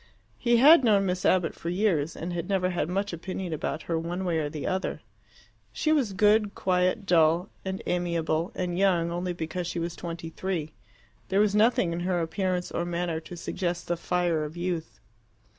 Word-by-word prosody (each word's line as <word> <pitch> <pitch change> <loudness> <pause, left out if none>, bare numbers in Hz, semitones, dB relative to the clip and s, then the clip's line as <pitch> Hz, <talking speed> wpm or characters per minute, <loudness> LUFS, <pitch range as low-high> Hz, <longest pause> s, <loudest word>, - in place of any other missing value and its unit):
He 240 -1 +3
had 285 +4 +8
known 205 -4 +4
Miss 180 -1 -1
Abbott 180 -3 +2
for 170 - -6
years, 175 -5 +1
and 175 +2 -5
had 175 +2 -4
never 185 -2 +1
had 175 -2 -1
much 195 +1 -1
opinion 180 +1 -4
about 155 - -3
her 165 -1 -1
one 175 +3 -3
way 170 -3 +1
or 150 -2 -1
the 150 -1 -6
other. 190 +1 -2 0.7
She 310 - 0
was 265 -10 +2
good, 210 +1 +3
quiet, 185 +3 +1
dull, 170 0 +3
and 190 0 -4
amiable, 170 0 0
and 180 -1 -2
young 175 -4 +2
only 175 +1 -2
because 175 +1 -4
she 175 - -4
was 170 0 -3
twenty 165 -1 -6
three: 165 -4 -3 0.6
there 195 - +2
was 210 -1 +3
nothing 210 -5 +3
in 170 - -3
her 180 0 0
appearance 180 +1 -1
or - - -1
manner 175 -1 -2
to 175 +2 -10
suggest 175 0 -3
the 175 - 0
fire 175 -2 0
of 150 +3 -7
youth. 175 -2 -3
180 Hz, 190 wpm, -27 LUFS, 170-190 Hz, 0.7 s, had